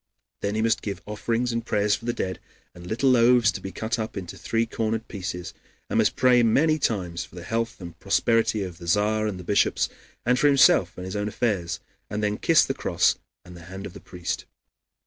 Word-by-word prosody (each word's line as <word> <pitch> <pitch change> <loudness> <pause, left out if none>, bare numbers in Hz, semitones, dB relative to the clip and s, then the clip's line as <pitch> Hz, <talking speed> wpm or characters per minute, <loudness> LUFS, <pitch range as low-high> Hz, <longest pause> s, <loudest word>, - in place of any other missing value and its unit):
Then 100 +1 -1
he 110 - +1
must 115 0 +2
give 100 -2 -5
offerings 115 +3 -1
and 115 0 -2
prayers 105 -2 +1
for 115 - -3
the 120 - +1
dead, 95 -5 -3 0.3
and 90 0 -11
little 120 +6 +2
loaves 120 -2 +5
to - - -7
be 95 - -6
cut 110 +6 -3
up 110 -1 -4
into 90 -3 -6
three 115 0 -1
cornered 115 0 -2
pieces, 90 -3 -5 0.4
and - - +2
must - - +2
pray 125 -1 +5
many 155 +7 +3
times 90 - -1
for - - -15
the 90 - -8
health 115 +3 -2
and 85 -3 -10
prosperity 110 +1 +2
of 90 -2 -7
the 85 - -9
Tzar 105 +4 +2
and 95 -3 -4
the - - -8
bishops, 100 +3 +2 0.4
and 125 +2 +3
for 145 - +4
himself 130 -10 +5
and 90 - -6
his 95 - -5
own 105 0 -1
affairs, 105 -6 -1 0.3
and 105 +1 -3
then 105 0 0
kiss - - +5
the - - -1
cross - - +1 0.3
and 90 0 -12
the 85 -1 -12
hand 95 +3 -8
of 95 - -8
the 100 - -10
priest. 90 -2 -5
105 Hz, 220 wpm, -25 LUFS, 95-115 Hz, 0.4 s, loaves